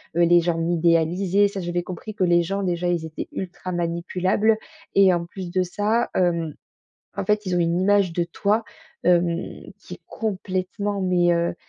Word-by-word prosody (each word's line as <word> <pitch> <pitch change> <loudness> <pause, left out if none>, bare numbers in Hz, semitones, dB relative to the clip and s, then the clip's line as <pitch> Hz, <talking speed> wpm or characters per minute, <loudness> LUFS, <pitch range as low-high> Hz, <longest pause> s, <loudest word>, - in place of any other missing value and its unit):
les 175 0 +5
gens 170 0 0
m'idéalisaient. 170 +4 +2
Ça 200 -1 -6
j'avais 175 0 -2
compris 185 +4 -7
que 190 - 0
les 175 -1 +4
gens 195 +4 -2
déjà, 175 -1 -1
ils 170 -2 -1
étaient 160 -1 -6
ultra 185 0 -5
manipulables. 180 +5 0 0.4
Et 195 -2 +6
en 170 -1 -1
plus 180 0 -7
de 185 +1 +1
ça, 210 +6 0
hem, 170 -4 0 0.6
en - - -2
fait, 210 0 +1
ils 180 -2 -1
ont - - +2
une 170 +1 +1
image 200 -2 +3
de 175 - 0
toi, 200 +6 0 0.4
hem, 175 0 +1
qui - - -10
est - - -16
complètement 200 -1 -3
mais, 175 -1 +3
heu 170 0 0
180 Hz, 175 wpm, -23 LUFS, 170-195 Hz, 0.6 s, Et